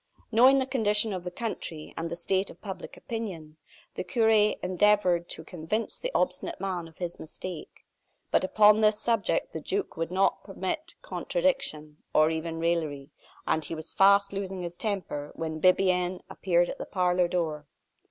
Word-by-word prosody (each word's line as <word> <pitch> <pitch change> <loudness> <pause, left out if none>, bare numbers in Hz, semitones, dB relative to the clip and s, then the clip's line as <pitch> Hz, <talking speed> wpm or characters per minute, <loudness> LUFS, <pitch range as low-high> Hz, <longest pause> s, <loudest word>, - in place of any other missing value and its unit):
Knowing 255 +5 +6
the 265 - +2
condition 220 -5 +2
of 185 -2 -4
the 180 - -4
country, 175 -6 -5
and 165 0 -3
the 170 - -4
state 190 +3 0
of - - -13
public 190 -3 -8
opinion, 185 -10 -6 0.4
the - - -4
cure 225 -4 +2
endeavored 205 -3 +3
to 160 - -5
convince 180 +7 -3
the - - -3
obstinate 340 -3 0
man 180 -4 -3
of 160 - -18
his 175 -2 -5
mistake; 165 +1 -8 0.5
but - - +3
upon 210 +2 +5
this 215 -1 +4
subject 230 - 0
the - - -4
duke 400 0 -2
would 165 0 -2
not 190 +1 +1
permit 195 +10 -4
contradiction, - - -1 0.2
or 155 +1 +5
even 160 0 -3
raillery; 160 -4 -1 0.3
and 160 -1 0
he 165 - -5
was 155 - -7
fast 200 +1 +5
losing 190 -2 -4
his 175 0 -5
temper, 180 -8 -3
when 160 -1 -4
Bibiaine 185 -1 +3
appeared 175 -2 +2
at - - -6
the - - -5
parlor 180 -2 +2
door. 155 -4 -2
185 Hz, 165 wpm, -28 LUFS, 165-210 Hz, 0.5 s, Knowing